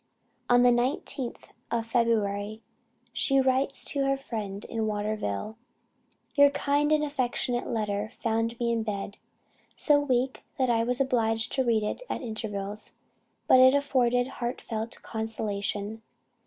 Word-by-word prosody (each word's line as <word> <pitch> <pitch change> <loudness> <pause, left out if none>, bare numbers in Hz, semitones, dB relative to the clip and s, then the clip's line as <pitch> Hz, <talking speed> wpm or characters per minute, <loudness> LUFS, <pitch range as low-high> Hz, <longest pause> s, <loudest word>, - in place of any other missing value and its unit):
On 245 0 +6
the 245 - +6
19th 245 +1 -1 0.3
of 230 -1 -1
February 220 -2 0 0.5
she 275 -1 +2
writes 265 +1 +2
to 280 -1 0
her 275 0 +1
friend 210 -7 -5
in 225 -1 -2
Waterville: 210 - -3 0.8
"Your 285 -1 +7
kind 285 +1 +1
and 305 -1 +3
affectionate 250 -4 -1
letter 210 -2 -2
found 225 +1 -2
me 235 -1 +1
in 230 -1 0
bed, 200 -2 -4 0.6
so 295 -1 +4
weak 260 -2 0 0.2
that 255 -2 +2
I 230 -1 +2
was 245 +1 0
obliged 225 -4 +1
to 265 - +1
read 230 -3 +2
it 210 - -3
at - - -3
intervals; 210 -2 -5 0.5
but 260 - +7
it 260 +1 +7
afforded 250 -3 +2
heartfelt 240 -3 -5
consolation. 215 -1 -3
235 Hz, 135 wpm, -28 LUFS, 215-260 Hz, 0.8 s, Your